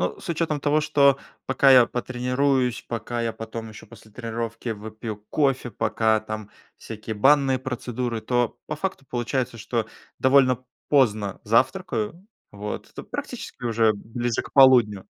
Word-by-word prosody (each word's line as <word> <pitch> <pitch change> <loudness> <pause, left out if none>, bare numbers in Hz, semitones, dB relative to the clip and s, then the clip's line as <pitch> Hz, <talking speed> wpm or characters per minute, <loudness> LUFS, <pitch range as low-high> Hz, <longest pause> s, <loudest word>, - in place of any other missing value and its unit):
Ну, - - -1
с - - -10
учетом 155 -3 -1
того, 150 +2 +2
что 140 -3 +4 0.3
пока 135 +1 +4
я 125 -2 +8
потренируюсь, 125 0 0
пока 120 +1 -3
я 115 -1 -1
потом 110 0 -7
еще 110 - -11
после 110 - -16
тренировки 115 0 -5
выпью 110 0 -6
кофе, 135 -4 +1
пока 110 +2 +1
там 110 -1 -7 0.3
всякие 110 0 -7
банные 135 +2 +4
процедуры, 125 -2 -3
то 120 +1 0
по 150 - -4
факту 190 -4 -4
получается, 120 0 -2
что 115 +1 -2 0.3
довольно 130 -2 +4 0.2
поздно 110 -8 +2
завтракаю. 160 - 0 0.3
Вот. 105 +1 -6
То - - -7
практически - - -7
уже 115 -2 +3
ближе 115 +3 -3
к - - -13
полудню. 120 -8 +6
120 Hz, 140 wpm, -24 LUFS, 110-135 Hz, 0.3 s, я